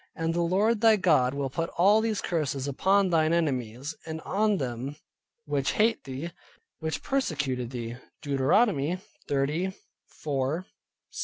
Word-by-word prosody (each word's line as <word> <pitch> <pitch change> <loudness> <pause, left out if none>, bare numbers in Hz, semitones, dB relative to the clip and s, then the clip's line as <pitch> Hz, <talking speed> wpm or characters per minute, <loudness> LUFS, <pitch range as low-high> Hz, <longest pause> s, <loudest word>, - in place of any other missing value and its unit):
And 165 0 -1
the 170 - 0
Lord 205 +6 +2
thy 225 -1 +7
God 150 -9 +3
will 140 -2 -2
put 165 +3 -2
all 200 +5 +5
these 220 -2 -1
curses 145 -5 -1
upon 190 +7 +2
thine 160 -1 +3
enemies, 135 -4 -1
and 160 0 -4
on 210 +3 +1
them 130 0 -4 0.5
which 145 -1 0
hate 225 -2 +2
thee, 135 +5 -5 0.5
which 160 -1 -3
persecuted 145 - -1
thee" 120 -1 -5 0.3
(Deuteronomy 145 - +2 0.3
30. 150 +7 0
160 Hz, 130 wpm, -28 LUFS, 135-190 Hz, 0.5 s, thy